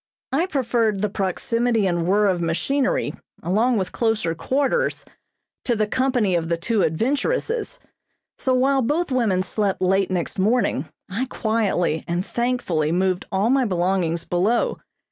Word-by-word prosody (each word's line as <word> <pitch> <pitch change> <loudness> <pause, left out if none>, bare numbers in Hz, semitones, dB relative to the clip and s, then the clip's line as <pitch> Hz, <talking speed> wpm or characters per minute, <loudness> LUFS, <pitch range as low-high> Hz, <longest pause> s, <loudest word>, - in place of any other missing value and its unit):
I 320 +7 +1
preferred 230 - 0
the 210 - 0
proximity 225 +3 0
and 175 -2 0
whirr 205 +3 +3
of 185 -3 +1
machinery 255 +12 0 0.3
along 220 +7 +2
with 190 -2 -2
closer 225 -7 0
quarters 285 - 0 0.6
to 240 - +1
the 215 -1 +1
company 245 -4 +1
of 165 -1 0
the 170 - +1
two 210 +4 0
adventuresses, 440 - -1 0.6
so 260 - 0
while 270 +1 +3
both 300 +6 0
women 215 -8 +1
slept 195 +1 -1
late 190 +1 +2
next 180 0 -2
morning 195 - +1 0.2
I 225 +8 -3
quietly 205 -9 0
and 175 +2 -1
thankfully 235 -11 -1
moved 185 +1 0
all 200 +5 +2
my 265 -1 +3
belongings 175 -3 0
below. 200 +7 +1
210 Hz, 145 wpm, -22 LUFS, 180-250 Hz, 0.6 s, whirr